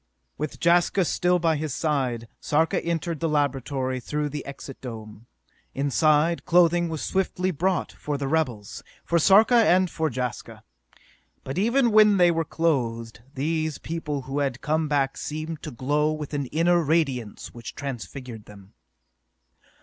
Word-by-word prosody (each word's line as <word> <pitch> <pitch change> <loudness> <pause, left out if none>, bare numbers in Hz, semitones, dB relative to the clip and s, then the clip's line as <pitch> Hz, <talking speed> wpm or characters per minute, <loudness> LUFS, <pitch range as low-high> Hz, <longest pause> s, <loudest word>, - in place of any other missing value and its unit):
With 150 -1 -5
Jaska 175 +2 +3
still 180 +2 +2
by 165 -3 +1
his 150 -3 -3
side, 130 -7 -1
Sarka 160 +5 +1
entered 170 -1 -2
the 165 - 0
laboratory 135 -3 -1
through 150 +4 -3
the 150 +1 -5
Exit 140 -1 -9
Dome. 110 -2 -9 0.5
Inside, 150 +4 +2
clothing 175 0 +3
was 160 -2 -4
swiftly 185 -1 -1
brought 180 +2 -1
for 145 -1 -4
the 140 -1 -3
rebels, 130 -9 -2 0.2
for 170 - +2
Sarka 205 +8 +5
and 185 -6 +4
for 160 -1 -1
Jaska. 125 -1 -5 0.8
But, 135 +7 -4
even 235 +3 +3
when 210 -1 +6
they 175 -1 +5
were 165 0 0
clothed, 120 -9 -1
these 155 +2 -1
people 150 -4 -4
who 135 +2 -3
had 135 -3 -2
come 155 +1 0
back 140 -2 0
seemed 155 +1 -5
to 155 - -6
glow 145 +4 0
with 155 -1 -6
an 140 -2 -2
inner 170 +5 +2
radiance 140 -8 -1
which 120 -1 -9
transfigured 125 -4 -7
them. 100 -1 -15
150 Hz, 150 wpm, -25 LUFS, 135-170 Hz, 0.8 s, when